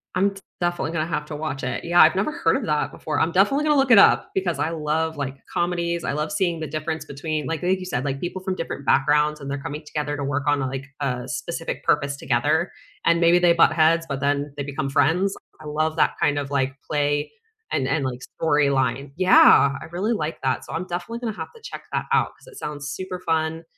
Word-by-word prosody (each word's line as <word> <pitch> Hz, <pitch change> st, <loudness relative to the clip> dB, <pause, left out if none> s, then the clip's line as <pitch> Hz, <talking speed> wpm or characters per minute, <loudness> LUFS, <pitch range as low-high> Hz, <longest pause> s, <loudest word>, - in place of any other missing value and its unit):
I'm 195 Hz, +2 st, +3 dB
d 195 Hz, -, -12 dB, 0.2 s
definitely 175 Hz, -2 st, -1 dB
gonna 160 Hz, -1 st, -1 dB
have 150 Hz, -3 st, -2 dB
to 150 Hz, -, -6 dB
watch 145 Hz, -3 st, -4 dB
it, 125 Hz, -, -3 dB
yeah, 175 Hz, +1 st, +5 dB
I've 160 Hz, +2 st, +6 dB
never 195 Hz, +10 st, 0 dB
heard 165 Hz, -, +1 dB
of -, -, -4 dB
that 150 Hz, -1 st, 0 dB
before, 155 Hz, -, -3 dB
I'm 165 Hz, -, +2 dB
definitely 200 Hz, -, +3 dB
gonna 300 Hz, -1 st, +3 dB
look 270 Hz, -1 st, +2 dB
it 225 Hz, -, +9 dB
up -, -, +6 dB
because 185 Hz, -3 st, -1 dB
I 155 Hz, -, 0 dB
love, 160 Hz, 0 st, -1 dB
like, 140 Hz, -2 st, -4 dB
comedies, 170 Hz, -1 st, -1 dB
I -, -, -1 dB
love 150 Hz, +2 st, -2 dB
seeing 170 Hz, 0 st, 0 dB
the 155 Hz, -, -4 dB
difference 155 Hz, +1 st, -4 dB
between, 150 Hz, +1 st, -4 dB
like 165 Hz, 0 st, -3 dB
like 185 Hz, +1 st, +1 dB
you 185 Hz, -, -7 dB
said, 145 Hz, -8 st, -2 dB
like, 135 Hz, -1 st, -2 dB
people 180 Hz, +3 st, -4 dB
from 190 Hz, -1 st, -2 dB
different 165 Hz, -5 st, -5 dB
backgrounds, 150 Hz, +2 st, +3 dB
and 140 Hz, -1 st, -7 dB
they're 140 Hz, -, -2 dB
coming 150 Hz, +2 st, -6 dB
together 145 Hz, -1 st, -3 dB
to 145 Hz, -, -3 dB
work 140 Hz, 0 st, -1 dB
on, 145 Hz, -1 st, +3 dB
like, 135 Hz, 0 st, -3 dB
a 125 Hz, -3 st, -2 dB
specific -, -, -4 dB
purpose 140 Hz, 0 st, +1 dB
together, 145 Hz, +8 st, +1 dB, 0.3 s
and 170 Hz, 0 st, +3 dB
maybe 170 Hz, +1 st, +5 dB
they 175 Hz, -1 st, +5 dB
butt 170 Hz, -, +5 dB
heads, 165 Hz, +1 st, +3 dB
but 140 Hz, -1 st, -2 dB
then 145 Hz, 0 st, -1 dB
they 140 Hz, -, -2 dB
become 140 Hz, -1 st, -3 dB
friends, 180 Hz, +7 st, +2 dB, 0.3 s
I -, -, -11 dB
love 155 Hz, +1 st, -1 dB
that 160 Hz, -, +2 dB
kind 145 Hz, -1 st, +2 dB
of, 140 Hz, -1 st, -3 dB
like, 135 Hz, -1 st, 0 dB, 0.2 s
play, 145 Hz, -1 st, 0 dB, 0.4 s
and 130 Hz, -, 0 dB
and, 140 Hz, +2 st, 0 dB
like, 125 Hz, -1 st, -3 dB, 0.2 s
storyline. 140 Hz, -3 st, +1 dB
Yeah, 180 Hz, -6 st, +6 dB
I -, -, -7 dB
really 195 Hz, +7 st, 0 dB
like 160 Hz, -6 st, -3 dB
that, 130 Hz, -1 st, -1 dB
so -, -, -8 dB
I'm 165 Hz, +3 st, -3 dB
definitely 180 Hz, +7 st, -4 dB
gonna 225 Hz, -3 st, -4 dB
have -, -, -7 dB
to 460 Hz, -, -15 dB
check -, -, -8 dB
that -, -, -1 dB
out -, -, +3 dB
'cause -, -, -21 dB
it 485 Hz, -5 st, -13 dB
sounds 145 Hz, -1 st, -5 dB
super 185 Hz, +5 st, -5 dB
fun, 160 Hz, -1 st, -1 dB
155 Hz, 235 wpm, -23 LUFS, 145-175 Hz, 0.4 s, it